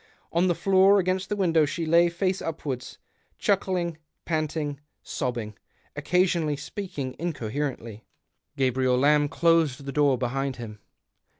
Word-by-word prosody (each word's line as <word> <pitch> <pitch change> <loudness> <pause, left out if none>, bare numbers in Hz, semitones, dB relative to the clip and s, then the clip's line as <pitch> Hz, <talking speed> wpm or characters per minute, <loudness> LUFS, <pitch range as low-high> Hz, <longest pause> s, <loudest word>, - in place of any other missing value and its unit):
On 170 +2 +2
the 175 - +2
Hoor 195 +2 +5
against 185 0 0
the 210 - 0
window 165 -5 +3
she 165 +3 -2
lay, 170 +2 +4
face 185 +2 -1
upwards 140 -6 -5 0.2
— - - -42
chuckling, 180 -5 0 0.3
panting, 155 -3 -2 0.2
sobbing 120 -6 -3 0.2
— - - -38
occasionally 175 -4 +1
speaking 145 -3 -6
incoherently. 130 -7 -4 0.5
Gabriel 130 -1 +2
Lamb 145 +2 +3
closed 160 -5 +2
the 140 - -4
door 140 -2 +3
behind 135 +2 -2
him. 110 -3 -8
150 Hz, 130 wpm, -26 LUFS, 130-175 Hz, 0.5 s, Hoor